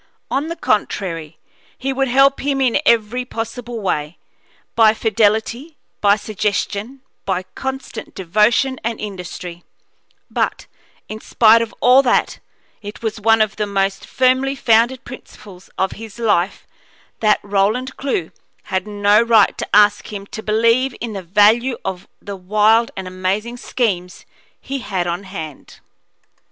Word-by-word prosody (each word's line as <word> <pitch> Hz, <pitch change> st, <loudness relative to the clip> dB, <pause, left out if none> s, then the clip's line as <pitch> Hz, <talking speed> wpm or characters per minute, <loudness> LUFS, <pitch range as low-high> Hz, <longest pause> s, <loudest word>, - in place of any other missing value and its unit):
On 280 Hz, +3 st, 0 dB
the 335 Hz, -, -4 dB
contrary, 170 Hz, -, -2 dB, 0.4 s
he 270 Hz, +1 st, -2 dB
would 270 Hz, 0 st, 0 dB
help 270 Hz, +2 st, +4 dB
him 275 Hz, 0 st, -1 dB
in 255 Hz, -1 st, +2 dB
every 235 Hz, +2 st, +2 dB
possible 235 Hz, 0 st, -6 dB
way 150 Hz, -4 st, -2 dB, 0.6 s
by 220 Hz, -1 st, +5 dB
fidelity, 220 Hz, +7 st, 0 dB, 0.2 s
by 205 Hz, 0 st, +5 dB
suggestion, 215 Hz, +4 st, -3 dB, 0.2 s
by 185 Hz, -1 st, -1 dB
constant 265 Hz, -4 st, -6 dB
devotion 215 Hz, +8 st, +2 dB
and 230 Hz, 0 st, -3 dB
industry; 180 Hz, -3 st, -7 dB, 0.6 s
but, -, -, -2 dB, 0.4 s
in 215 Hz, 0 st, -7 dB
spite 230 Hz, 0 st, +5 dB
of 230 Hz, -1 st, -3 dB
all 250 Hz, +2 st, +6 dB
that, 250 Hz, -3 st, +1 dB, 0.4 s
it 205 Hz, +2 st, -9 dB
was 220 Hz, -1 st, -3 dB
one 225 Hz, +1 st, +4 dB
of 205 Hz, -2 st, -5 dB
the 210 Hz, -, -1 dB
most 195 Hz, -1 st, -1 dB
firmly 260 Hz, +1 st, +2 dB
founded 235 Hz, +1 st, +2 dB
principles 200 Hz, -7 st, -12 dB
of 190 Hz, 0 st, 0 dB
his 220 Hz, -1 st, -10 dB
life 205 Hz, -5 st, 0 dB, 0.5 s
that 215 Hz, -1 st, +3 dB
Roland 205 Hz, +6 st, 0 dB
Clewe 225 Hz, -, -2 dB, 0.4 s
had 190 Hz, +1 st, -1 dB
no 205 Hz, +1 st, +3 dB
right 230 Hz, -3 st, +4 dB
to -, -, -4 dB
ask 205 Hz, 0 st, +4 dB
him 200 Hz, -1 st, -6 dB
to 220 Hz, -, -8 dB
believe 230 Hz, +4 st, +2 dB
in 230 Hz, -2 st, -5 dB
the 195 Hz, -, -5 dB
value 215 Hz, +7 st, +3 dB
of 190 Hz, -1 st, -5 dB
the 200 Hz, -1 st, -7 dB
wild 215 Hz, +5 st, +3 dB
and 190 Hz, -1 st, -5 dB
amazing 190 Hz, +6 st, -2 dB
schemes 195 Hz, -9 st, -2 dB, 0.3 s
he 275 Hz, 0 st, -5 dB
had 190 Hz, -7 st, -2 dB
on 175 Hz, +3 st, -3 dB
hand. 160 Hz, -7 st, -9 dB
215 Hz, 140 wpm, -19 LUFS, 195-240 Hz, 0.6 s, all